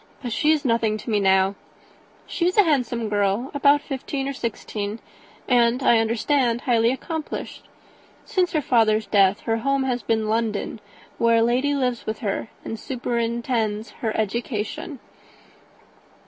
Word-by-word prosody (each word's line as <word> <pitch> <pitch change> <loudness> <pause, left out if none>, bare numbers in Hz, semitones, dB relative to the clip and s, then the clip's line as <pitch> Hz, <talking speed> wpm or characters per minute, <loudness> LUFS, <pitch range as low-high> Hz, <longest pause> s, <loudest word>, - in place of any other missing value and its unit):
But 240 -3 -3
she 300 - +1
is 305 -2 +1
nothing 230 -3 +1
to 225 - -6
me 210 - +2
now. 190 0 +3 0.7
She 345 - -1
is 365 - -1
a 415 - +8
handsome 245 - 0
girl, 205 +4 0
about 285 0 +4
fifteen 270 -1 -4
or 275 - -2
sixteen, 215 -4 -4 0.5
and, 245 +1 +3
I 235 -2 +5
understand, 235 +2 +1
highly 235 -2 +2
accomplished. 310 +4 -5 0.6
Since 370 -6 0
her 305 -2 +1
father's 220 -3 +3
death 200 -1 +3
her 225 0 0
home 275 +3 0
has 250 -2 -1
been 220 -1 0
London, 220 -1 -1 0.4
where 230 0 +4
a 225 - +4
lady 255 +5 +1
lives 250 -3 -1
with 215 0 -2
her, 205 0 -2 0.2
and 225 - -5
superintends 235 -3 -2
her 220 -2 -1
education." 235 - -3
235 Hz, 145 wpm, -23 LUFS, 220-270 Hz, 0.7 s, a